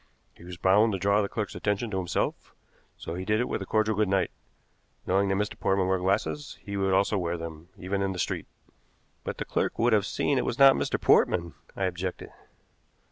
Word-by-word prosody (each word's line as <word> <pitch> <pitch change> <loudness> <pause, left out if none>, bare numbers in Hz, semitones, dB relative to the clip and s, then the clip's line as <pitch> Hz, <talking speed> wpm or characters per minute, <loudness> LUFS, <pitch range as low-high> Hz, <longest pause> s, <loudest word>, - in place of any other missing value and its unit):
He - - -17
was 90 0 -8
bound 100 +5 +4
to - - 0
draw 100 +2 +2
the 100 - -2
clerk's 110 -2 -3
attention 105 +2 -2
to 95 - -2
himself, 90 -2 -3 0.4
so 80 - -6
he 90 +2 -4
did 105 +2 +1
it 125 - 0
with - - -3
a 95 - -6
cordial 110 0 +2
good 105 0 +2
night. 95 0 +1 0.7
Knowing 95 +1 +2
that 95 - +1
Mr. 105 +1 -2
Portman 95 -1 +1
wore 95 0 +1
glasses, 100 +10 -1
he 100 - -7
would 95 -1 +1
also 100 +2 +2
wear 85 -1 -2
them, 80 0 -8
even 95 +2 -2
in 95 0 0
the 95 - -5
street." - - -2 0.8
"But - - -5
the - - -4
clerk - - -1
would 120 0 +3
have 105 -2 +3
seen 140 -2 0
it - - 0
was 120 - -2
not 135 -1 +8
Mr. - - -1
Portman," 85 -3 +3 0.2
I 95 - -3
objected. 90 0 -3
95 Hz, 215 wpm, -27 LUFS, 90-105 Hz, 0.8 s, not